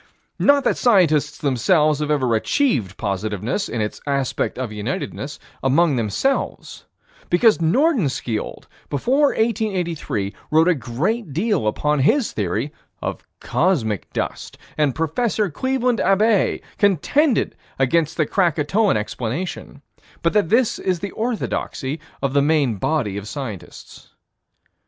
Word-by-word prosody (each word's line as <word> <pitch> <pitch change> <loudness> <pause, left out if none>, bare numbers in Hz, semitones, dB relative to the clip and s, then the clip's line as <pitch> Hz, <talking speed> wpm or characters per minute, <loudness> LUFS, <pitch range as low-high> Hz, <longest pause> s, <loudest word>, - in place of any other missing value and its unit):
Not 285 -1 +4
that - - +1
scientists 155 - +3
themselves 150 - +2
have 150 -1 -2
ever 130 -5 +1
achieved 110 - +1
positiveness, 105 - -2
in 115 - -2
its 105 - -4
aspect 140 -2 -1
of 125 -4 -3
unitedness, 130 +6 -4 0.2
among 145 +3 +3
themselves 120 - -2 0.4
because 215 +4 +4
Nordenskiold, 165 - 0 0.2
before 260 - +2
1883, 185 - -1 0.2
wrote 160 +2 +4
a 180 - +5
great 150 - -2
deal 185 - 0
upon 150 +7 0
his 225 - +2
theory 105 +8 -2 0.3
of - - -4 0.2
cosmic 130 - 0
dust, - - -4 0.2
and 150 -4 +1
Prof. 200 +3 0
Cleveland 255 - 0
Abbe 205 +2 +2 0.2
contended 220 - +2 0.2
against 155 +4 +1
the 155 - +2
Krakatoan 175 - +2
explanation 125 +8 -5 0.4
but 170 - +2
that 205 -6 +2
this 235 0 +2
is 180 -3 -1
the 200 -1 -4
orthodoxy 210 - -3 0.2
of 135 -1 0
the 140 - +4
main 140 -6 +2
body 110 -5 -1
of 100 +1 -6
scientists. 115 - -8
155 Hz, 120 wpm, -21 LUFS, 130-205 Hz, 0.4 s, a